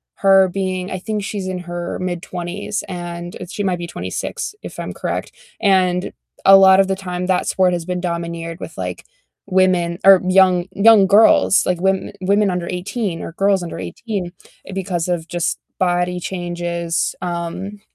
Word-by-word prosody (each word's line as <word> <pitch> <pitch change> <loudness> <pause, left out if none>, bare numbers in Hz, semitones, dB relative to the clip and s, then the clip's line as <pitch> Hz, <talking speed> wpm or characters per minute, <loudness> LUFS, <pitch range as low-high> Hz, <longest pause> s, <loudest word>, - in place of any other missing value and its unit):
her 195 -1 +5
being 185 0 -3
I 185 - -3
think 210 +1 -3
she's 195 -2 -4
in 185 -1 -3
her 175 0 -5
mid-20s, 180 +3 -4
and 175 -1 -6 0.2
she 205 - -3
might 185 -2 0
be 170 - -5
26, 420 - -5
if - - -8
I'm - - -5
correct, - - -4 0.3
and 185 -3 +2 0.3
a 195 - +9
lot 190 0 +7
of 195 - +4
the 190 - 0
time, 180 -1 -4
that 185 -1 +1
sport 185 -1 +2
has 170 -1 -3
been 180 -1 -3
domineered 170 -1 -4
with, - - -9
like, - - -5 0.4
women 185 -3 +2
or 195 -2 +8
young, 185 -2 +4
young 205 -2 +6
girls, 205 0 +5
like, 180 -2 0
women 190 +1 0
women 200 +2 +2
under 180 -1 -2
18 180 0 -3
or 165 - -7
girls 195 0 +2
under 170 - -6
18 180 - -5 0.4
because 180 -3 -2
of 170 -2 -2
just 175 0 -2 0.2
body 180 0 +1
changes, 175 -2 -2
um, 180 +4 -5
180 Hz, 165 wpm, -19 LUFS, 175-195 Hz, 0.4 s, a